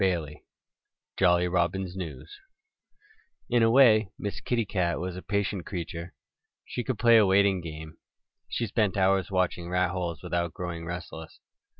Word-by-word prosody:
XII 85 -6 -1 0.7
JOLLY 90 -1 +3
ROBIN'S 90 +1 -1
NEWS 80 -9 -7 1.2
IN 120 -1 +4
A 115 - +5
WAY 115 -5 +5
Miss 105 - -5
Kitty 120 -2 0
Cat 90 -4 -1
was 90 0 -4
a 90 - -7
patient 100 -2 -2
creature. 85 -2 -6 0.5
She 125 - -4
could 130 -1 -2
play 115 +1 +6
a 110 - +6
waiting 95 -1 +3
game. 80 -1 -8 0.5
She 120 - -1
spent 105 -2 0
hours 95 0 +2
watching 90 -2 -1
rat 90 -1 +1
holes 85 -4 -4
without 85 -1 -2
growing 85 -2 -5
restless. 85 -2 -7
90 Hz, 145 wpm, -27 LUFS, 85-100 Hz, 1.2 s, play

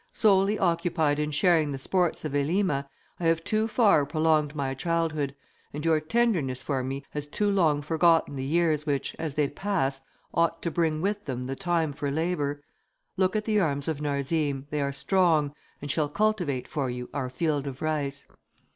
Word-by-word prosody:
Solely 200 0 +3
occupied 165 -5 +1
in 150 0 0
sharing 155 0 +3
the 135 - -3
sports 175 +4 0
of 155 - -2
Elima, 145 0 +1 0.3
I 175 - -3
have 165 0 +2
too 215 +3 +1
far 215 - +4
prolonged 155 -1 +1
my 135 -2 -1
childhood, 155 -2 -1 0.4
and 150 +2 -5
your 160 -1 +4
tenderness 155 - 0
for 135 -3 -1
me 135 +2 -4
has 150 0 -4
too 205 +7 0
long 155 -7 +2
forgotten 165 -1 +3
the 130 - -3
years 155 +1 +1
which, 140 -2 -1
as 155 -4 -3
they 150 -2 +2
pass, 145 -5 -1 0.3
ought 165 0 +1
to 170 - -1
bring 160 -2 0
with 205 +2 -1
them 125 -2 -3
the 135 +1 -4
time 165 -2 0
for 140 +1 -3
labour. 145 -2 -1 0.5
Look 190 +1 +1
at 210 0 0
the 215 -1 +2
arms 145 -6 0
of 155 -2 -2
Narzim, 140 -1 -1
they 150 -1 -1
are 140 0 0
strong, 150 0 +2 0.3
and 145 - -1
shall 150 -1 +1
cultivate 180 -8 0
for 140 -4 -2
you 125 0 -5
our 130 -3 -2
field 145 0 -1
of 135 -1 -6
rice." 140 -3 -2
155 Hz, 180 wpm, -27 LUFS, 140-170 Hz, 0.5 s, far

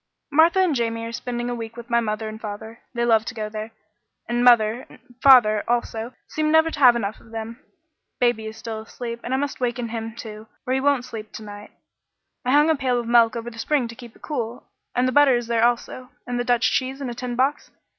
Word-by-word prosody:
"Martha 320 +5 +5
and 370 -4 +3
Jamie 230 -2 -1
are 230 - -5
spending 240 0 -4
a 245 - -2
week 230 -1 -7
with 235 0 -9
my 235 - +4
mother 220 -1 -2
and 215 0 -8
father. 220 +2 -7 0.2
They 235 0 +1
love 225 -2 +4
to 245 - -6
go 215 -1 -4
there, 215 +1 -6 0.6
and 240 0 0
mother 235 -1 +4
and - - -15 0.2
father, 225 -6 +6
also, 235 0 -2
seem 310 0 -1
never 320 +1 +4
to 285 - -6
have 250 -4 +7
enough 215 -2 -3
of 230 - -19
them. 225 +2 -7 0.6
Baby 240 -3 +1
is 220 0 -8
still 220 0 -6
asleep, 235 +1 -7
and 245 - -5
I 260 - +2
must 285 0 -3
waken 245 -1 -2
him, 225 0 -5
too, 220 -2 -9 0.2
or 255 - 0
he 265 - +2
won't 275 -2 +2
sleep 220 -3 -8
to 220 - -8
night. 205 0 -10 0.7
I 250 - -2
hung 295 +3 +5
a - - +3
pail 255 -3 0
of 240 - -4
milk 230 -1 +4
over 235 0 -5
the 230 - -11
spring 275 0 +1
to 230 - -9
keep 240 -1 -12
it - - -22
cool, 240 -5 -4 0.3
and 250 +1 +2
the - - +1
butter 285 -1 +5
is 240 0 -1
there 230 -1 +1
also 245 +1 0 0.2
and 245 0 -3
the - - 0
Dutch 245 -1 +2
cheese 260 +1 -1
in 275 - -4
a 240 - -4
tin 245 0 -5
box. 270 +4 0
240 Hz, 240 wpm, -23 LUFS, 225-255 Hz, 0.7 s, have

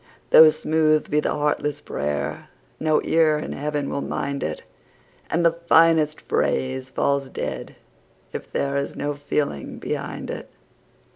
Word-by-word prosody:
Though 160 0 +10
smooth 155 0 +1
be 150 - +3
the - - 0
heartless 150 -1 -1
prayer, 75 0 -3 0.3
no 155 -1 +2
ear 160 -2 +3
in 150 - -5
Heaven 145 0 -2
will 140 - -2
mind 140 0 -3
it, 80 0 -4 0.7
And 170 +1 +1
the 165 - +6
finest 165 -2 +3
phrase 130 0 -1
falls 140 0 0
dead - - -5 0.6
if - - -7
there 140 0 -1
is 140 - -3
no 145 +1 -2
feeling 145 - -3
behind - - -4
it. - - -7
150 Hz, 140 wpm, -23 LUFS, 140-155 Hz, 0.7 s, Though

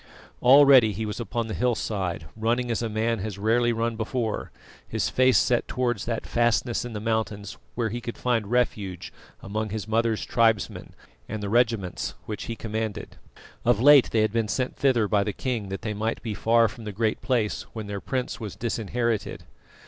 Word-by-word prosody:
Already 130 -4 +7
he 110 +4 -3
was 105 +2 -5
upon 120 0 -2
the 110 - -5
hillside, 100 -9 -1
running 120 +2 0
as 115 - -1
a 115 - -2
man 110 +1 0
has 100 0 -5
rarely 115 +4 +2
run 115 0 -1
before 110 0 -3 0.4
his - - -1
face 130 0 +4
set 120 -1 +2
towards 120 -5 -1
that 115 -1 -3
fastness 120 0 +1
in 120 -1 -6
the 105 - -4
mountains 110 -2 -2 0.2
where 115 -2 0
he 120 +3 -4
could 120 - -6
find 115 -5 0
refuge 100 -7 -1 0.3
among 110 +2 -3
his 105 +1 -4
mother's 115 0 +1
tribesmen 115 -4 +1 0.3
and 110 -1 -4
the 100 - -2
regiments 110 -5 0
which 105 - -5
he 115 - -4
commanded. 110 -1 -4 0.5
Of 120 -3 +3
late 140 +1 +7
they 110 - +2
had 110 -1 +1
been 115 -2 +1
sent 130 +4 -2
thither 125 -6 +2
by 100 -1 +2
the 105 - -3
king 115 -5 -3
that 95 +1 -5
they 110 -1 -2
might 110 +2 -2
be 110 -3 -3
far 115 +2 +3
from 115 +1 -10
the 105 - -4
Great 110 +2 -1
Place 120 -6 -1
when 110 -3 -5
their 100 -1 -5
prince 130 0 -3
was 105 -5 -6
disinherited. 115 -1 -2
115 Hz, 185 wpm, -26 LUFS, 105-120 Hz, 0.5 s, Already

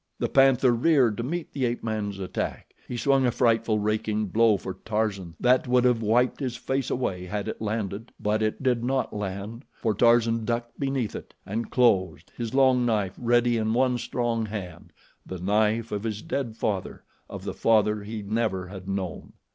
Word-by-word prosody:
The - - -1
panther 135 -2 +5
reared 125 -2 +3
to 115 - -2
meet 170 +6 -4
the 135 -3 0
ape 120 0 -2
man's 105 -3 -3
attack. 95 -1 -4
He 125 - -4
swung 135 +2 +3
a - - +2
frightful 115 -2 +2
raking 105 0 -1
blow 110 0 +4
for 95 - -6
Tarzan 105 -6 -2
that 125 +1 +3
would 125 0 +3
have 125 -2 +3
wiped 120 +3 +2
his 130 -4 -3
face 135 0 -2
away 90 -8 -2
had 100 +2 -3
it - - -5
landed, 110 0 -3
but 105 +1 0
it 110 +5 -1
did 125 -3 +1
not 130 +1 -1
land, 105 +4 -5
for 110 -3 -1
Tarzan 115 0 +3
ducked 120 +1 -3
beneath 135 -6 -1
it - - -9
and 110 +4 -3
closed, 105 -7 +2
his 120 +1 -4
long 130 -2 +4
knife 105 -5 0
ready 120 0 +2
in 110 0 0
one 125 -1 +2
strong 115 -2 -1
hand 100 -5 -7 0.3
the 95 - -7
knife 110 +4 +1
of 105 - -2
his 110 -1 -4
dead 120 -5 -3
father, 100 -4 -3 0.3
of - - -7
the - - -4
father 105 -1 +2
he 105 +1 -6
never 105 -3 -1
had 95 -1 -9
known. 95 -3 -4
115 Hz, 185 wpm, -26 LUFS, 105-125 Hz, 0.3 s, panther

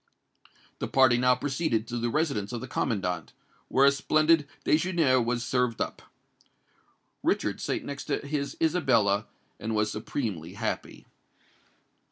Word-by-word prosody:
The - - -2
party 130 -2 +5
now 125 0 +4
proceeded 135 -3 -1
to 120 - -4
the 120 +1 0
residence 140 -8 -1
of 120 - -3
the 130 - -7
commandant, 90 - -2 0.3
where 135 +1 +4
a 140 - +7
splendid 155 +2 +3 0.2
déjeuner 155 -6 +3
was 120 +1 -1
served 125 -2 0
up. - - -3 1.2
Richard - - 0
sate - - -2
next 140 -1 -6
to - - 0
his 140 -1 -3
Isabella, 115 - +2 0.3
and 110 +1 -3
was 105 0 +1
supremely 105 - -4
happy. 110 +1 -4
125 Hz, 135 wpm, -28 LUFS, 110-145 Hz, 1.2 s, a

